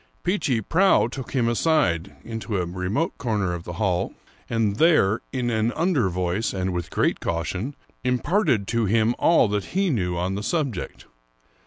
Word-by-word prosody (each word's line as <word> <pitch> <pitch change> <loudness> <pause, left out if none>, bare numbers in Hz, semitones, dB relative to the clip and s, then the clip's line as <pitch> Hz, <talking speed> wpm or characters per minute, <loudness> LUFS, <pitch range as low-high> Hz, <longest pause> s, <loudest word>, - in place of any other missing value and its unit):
Peechy 145 - 0
Prauw 180 - +3
took 130 -2 -7
him 125 -4 +2
aside 115 - +1
into 115 -2 -4
a 90 - 0
remote 90 - -2
corner 105 -7 0
of 85 -1 -6
the 85 - -6
hall, 90 -1 -1 0.3
and 110 -3 0
there, 155 - +4
in 125 -2 -1
an 110 +1 +1
under 155 - +1
voice 90 +4 -1
and 95 -1 -2
with 90 -1 -3
great - - +1
caution, 90 - -3 0.3
imparted 125 - +1
to 115 -1 +1
him 110 +3 +2
all 165 -8 +5
that 105 - -3
he 195 -3 +2
knew 90 -8 -1
on 90 +2 -1
the 100 - -3
subject. 135 - -3
110 Hz, 165 wpm, -24 LUFS, 95-130 Hz, 0.3 s, all